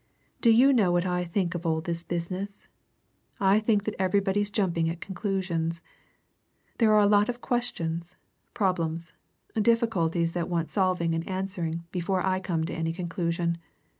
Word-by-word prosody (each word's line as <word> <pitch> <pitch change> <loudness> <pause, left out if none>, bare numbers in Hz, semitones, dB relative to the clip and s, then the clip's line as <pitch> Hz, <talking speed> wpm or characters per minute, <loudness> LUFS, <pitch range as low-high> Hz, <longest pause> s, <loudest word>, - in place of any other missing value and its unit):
"Do 235 - +5
you 250 +5 +6
know 205 -8 +3
what 175 +1 +2
I 180 -1 0
think 175 +1 -1
of 175 -1 -4
all 160 -2 +1
this 170 +1 -3
business? 185 +4 -4 0.7
I 195 +1 +4
think 215 -2 +2
that 215 - -2
everybody's 195 +2 +1
jumping 175 -6 0
at 165 0 -4
conclusions. 180 -4 -2 1.0
There 220 -2 +5
are 210 -1 +6
lots 205 +1 +4
of 245 0 -3
questions, 170 -10 -2 0.4
problems, 170 -4 -1 0.4
difficulties 200 -7 +2
that 175 0 -2
want 165 -2 -1
solving 185 -4 +1
and 165 +2 -3
answering 185 -3 -3
before 185 +1 -1
I 185 0 +1
come 170 -4 -1
to 170 - -5
any 165 -1 -2
conclusion. 170 -1 -2
180 Hz, 150 wpm, -27 LUFS, 170-205 Hz, 1.0 s, you